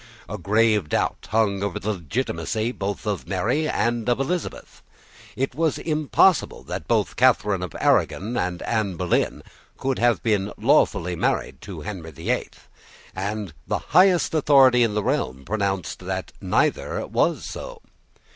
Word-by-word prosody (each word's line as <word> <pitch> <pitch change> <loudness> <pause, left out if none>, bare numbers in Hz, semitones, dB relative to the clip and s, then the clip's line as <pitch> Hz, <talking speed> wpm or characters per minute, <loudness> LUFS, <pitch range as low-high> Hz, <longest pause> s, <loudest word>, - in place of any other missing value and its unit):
A 105 +5 -6
grave 105 -1 +2
doubt - - -1
hung 105 -3 +1
over 100 -3 -2
the 105 +4 -1
legitimacy 110 - -2
both 100 -3 -4
of 105 -3 -3
Mary 120 +12 0
and 120 0 0
of 120 - +2
Elizabeth. 160 +5 -4 0.5
It 135 0 -1
was 160 +2 0
impossible 155 +3 +2
that - - -6
both - - +1
Catharine 100 -3 +3
of 90 - -6
Aragon 110 +7 +1
and 90 -3 -2
Anne 110 -5 -1
Boleyn 85 +1 0 0.3
could 135 -1 -1
have 120 -1 +2
been 105 -3 0
lawfully 90 +1 +2
married - - -1
to - - -8
Henry 95 -6 -6
the 75 - -3
Eighth; - - -4 0.5
and 100 -2 -4
the - - 0 0.2
highest 180 -1 +5
authority 135 -5 +5
in 115 -3 +2
the 105 - 0
realm 65 -7 -1
had 70 - -17
pronounced 100 -4 -2
that - - -4
neither - - 0
was - - 0
so. - - -7
105 Hz, 150 wpm, -23 LUFS, 95-125 Hz, 0.5 s, highest